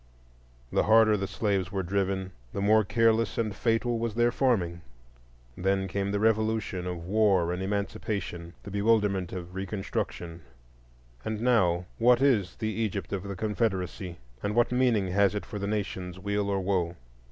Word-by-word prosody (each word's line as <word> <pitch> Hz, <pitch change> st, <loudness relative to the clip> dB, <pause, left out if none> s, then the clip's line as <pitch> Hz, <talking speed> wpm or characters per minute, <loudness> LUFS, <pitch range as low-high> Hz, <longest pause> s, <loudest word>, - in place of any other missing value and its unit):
The -, -, +2 dB
harder 110 Hz, 0 st, +6 dB
the 100 Hz, -1 st, -2 dB
slaves 100 Hz, -3 st, -1 dB
were 95 Hz, -2 st, -1 dB
driven 95 Hz, 0 st, -1 dB, 0.2 s
the -, -, -3 dB
more 110 Hz, +2 st, +5 dB
careless 115 Hz, +1 st, +2 dB
and 110 Hz, -3 st, -1 dB
fatal 115 Hz, +1 st, +1 dB
was 115 Hz, -2 st, -2 dB
their 120 Hz, +1 st, +3 dB
farming. 95 Hz, -11 st, +1 dB, 0.7 s
Then 95 Hz, +1 st, 0 dB
came 100 Hz, +1 st, -2 dB
the 100 Hz, -, 0 dB
revolution 110 Hz, -4 st, +1 dB
of 85 Hz, -2 st, -5 dB
war 95 Hz, -3 st, +3 dB
and 90 Hz, -, -4 dB
Emancipation, 95 Hz, -3 st, -3 dB
the 100 Hz, -, -8 dB
bewilderment 100 Hz, -3 st, +2 dB
of 90 Hz, -1 st, -7 dB
Reconstruction,—and 65 Hz, -, -6 dB
now, 95 Hz, -8 st, +2 dB
what 120 Hz, +1 st, +5 dB
is 115 Hz, -10 st, +2 dB
the 110 Hz, -1 st, -2 dB
Egypt 100 Hz, -5 st, -2 dB
of 95 Hz, -, -1 dB
the 100 Hz, 0 st, -6 dB
Confederacy, 95 Hz, -3 st, -2 dB, 0.2 s
and 105 Hz, +1 st, -2 dB
what 120 Hz, 0 st, +3 dB
meaning 120 Hz, -6 st, +2 dB
has 100 Hz, +2 st, +3 dB
it 105 Hz, -, -3 dB
for 105 Hz, -4 st, -6 dB
the 100 Hz, -, -2 dB
nation's 95 Hz, -3 st, -3 dB
weal 100 Hz, +1 st, -1 dB
or 100 Hz, -1 st, +1 dB
woe? 90 Hz, -3 st, 0 dB
100 Hz, 155 wpm, -28 LUFS, 90-110 Hz, 0.7 s, harder